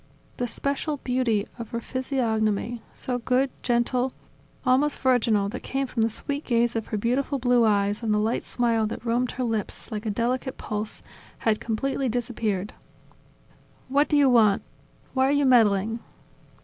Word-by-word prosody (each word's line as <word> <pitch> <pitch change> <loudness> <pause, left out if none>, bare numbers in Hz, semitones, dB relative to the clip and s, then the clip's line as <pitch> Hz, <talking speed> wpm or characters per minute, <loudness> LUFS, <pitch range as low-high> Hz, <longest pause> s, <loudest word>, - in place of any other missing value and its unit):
The 245 - -1
special 280 +4 -2
beauty 250 -6 0
of 230 - -6
her 235 - -3
physiognomy, 235 -3 -1
so 250 -1 -3 0.4
gentle, 245 +1 +1
good, - - -24 0.5
almost 275 +3 +3
virginal, 230 -6 +2
that 245 - -6
came 270 +1 -2
from 245 -3 -2
the 225 - +3
sweet 285 +6 -4
gaze 235 -1 +1
of 225 - -2
her 215 - -2
beautiful 255 +6 0
blue 245 -2 +3
eyes 205 0 +2
and 225 -2 -1
the 210 - +3
light 220 +3 +1
smile 230 -3 +1
that 220 - -6
roamed 240 +1 0
her 255 - -2
lips, 225 0 -3
like 215 +1 -4
a - - +1
delicate 250 +5 -1
pulse, 210 0 -4 0.3
had 220 -2 +1
completely 265 +4 -1
disappeared. 220 -5 -2 1.2
"What 285 +3 +3
do 295 - +3
you 285 -1 +5
want? 220 -5 +4 0.5
Why 265 0 +3
are - - +2
you 285 0 +3
meddling?" 225 -3 +4
240 Hz, 160 wpm, -25 LUFS, 220-260 Hz, 1.2 s, you